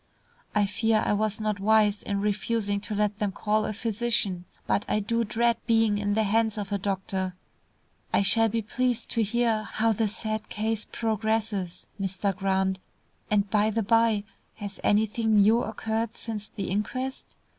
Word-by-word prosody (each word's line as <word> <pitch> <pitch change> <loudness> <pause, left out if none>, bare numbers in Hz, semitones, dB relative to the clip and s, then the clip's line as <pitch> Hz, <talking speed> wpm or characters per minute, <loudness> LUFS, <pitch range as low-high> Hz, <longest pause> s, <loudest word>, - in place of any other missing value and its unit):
"I 210 -1 +4
fear 220 +2 +1
I - - +2
was 215 +1 0
not 215 -1 -1
wise 210 0 +3
in 200 -1 -2
refusing 205 0 0
to 210 - -5
let 210 0 0
them 210 -3 0
call 215 +2 0
a - - -2
physician, 220 -4 -1 0.2
but 205 - +1
I 210 - +2
do 230 +3 0
dread 235 +2 +1
being 225 -3 +3
in 205 0 0
the 220 - +3
hands 220 +1 +1
of 205 -1 -4
a 200 - 0
doctor. 190 -1 -2 0.8
I - - +3
shall 225 +3 +3
be 225 +1 -1
pleased 245 +2 -1
to 230 - +1
hear 225 0 +1
how 220 +1 0
this 220 0 0
sad 215 -1 -3
case 220 0 -1
progresses, 220 -4 -2 0.2
Mr. 195 0 0
Grant, 190 -1 0 0.5
and 205 -1 +2
by 215 0 +3
the 220 +1 0
bye, 225 -1 +3 0.3
has 205 -2 -7
anything 220 +1 +2
new 215 +3 +5
occurred 220 0 -2
since 215 -2 -4
the 200 - -5
inquest? 255 +6 -3
215 Hz, 165 wpm, -27 LUFS, 200-225 Hz, 0.8 s, new